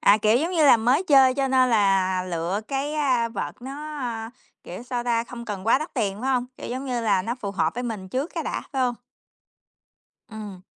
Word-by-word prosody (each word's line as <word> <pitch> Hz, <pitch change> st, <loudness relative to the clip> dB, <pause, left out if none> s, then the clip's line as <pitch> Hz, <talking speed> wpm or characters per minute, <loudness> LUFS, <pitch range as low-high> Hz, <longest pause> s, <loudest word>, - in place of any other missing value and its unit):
à, 200 Hz, -, +6 dB
kiểu 215 Hz, +2 st, +3 dB
giống 320 Hz, +7 st, 0 dB
như 325 Hz, -4 st, +3 dB
là, 265 Hz, -, +8 dB
mới 245 Hz, +8 st, +2 dB
chơi 270 Hz, -6 st, +5 dB
cho 275 Hz, -1 st, 0 dB
nên 260 Hz, -1 st, +3 dB
là 195 Hz, -4 st, +2 dB
lựa 175 Hz, +2 st, -2 dB
cái, 275 Hz, +2 st, -2 dB
a, 255 Hz, -6 st, +1 dB
vợt 240 Hz, -, -6 dB
nó, 295 Hz, +3 st, -6 dB, 0.6 s
kiểu, 180 Hz, +6 st, -8 dB
sao 245 Hz, -1 st, -3 dB
ta, 230 Hz, -1 st, +1 dB
không 235 Hz, -1 st, -9 dB
cần 205 Hz, -3 st, -6 dB
quá 230 Hz, -, +5 dB
đắt 310 Hz, -, -7 dB
tiền, 205 Hz, -5 st, -1 dB
phải 265 Hz, +2 st, -1 dB
hông? 250 Hz, -2 st, +1 dB
Kiểu -, -, -7 dB
giống 260 Hz, +3 st, -4 dB
như 250 Hz, -2 st, -1 dB
là, 205 Hz, -5 st, +2 dB
nó 235 Hz, +5 st, -2 dB
phù 210 Hz, -6 st, -5 dB
hợp 190 Hz, -4 st, 0 dB
với 245 Hz, -, -3 dB
mình 215 Hz, -6 st, -5 dB
trước 265 Hz, -, -2 dB
cái -, -, -3 dB
đã, -, -, -2 dB
phải 265 Hz, -2 st, 0 dB
hông? 245 Hz, -1 st, +1 dB, 1.4 s
Ừm. 210 Hz, -4 st, -8 dB
240 Hz, 225 wpm, -24 LUFS, 205-265 Hz, 1.4 s, là